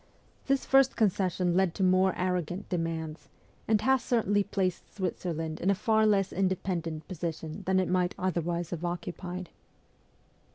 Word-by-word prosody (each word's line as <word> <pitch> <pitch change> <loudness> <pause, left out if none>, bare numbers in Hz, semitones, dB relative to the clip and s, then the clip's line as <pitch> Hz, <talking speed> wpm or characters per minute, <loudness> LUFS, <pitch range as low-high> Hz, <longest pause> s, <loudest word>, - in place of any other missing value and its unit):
This 275 0 +1
first 270 -1 +4
con 215 -4 +4
cession 180 -1 0
led 185 -2 +2
to 195 - -1
more 185 0 +3
arrogant 180 +1 -2
demands, 165 -3 -3 0.4
and 220 -1 +3
has 265 +1 +3
certainly 205 -5 +2
placed 190 -3 -2
Switzerland 165 -4 -3
in 185 - +1
a 200 - +4
far 220 +2 +3
less 195 -2 +2
independent 180 -4 -1
position 165 -1 -5
than 190 0 +3
it 185 - +1
might 180 -1 +1
otherwise 175 -2 -1
have 175 -1 -4
occupied. 175 +1 -5
185 Hz, 150 wpm, -29 LUFS, 170-195 Hz, 0.4 s, first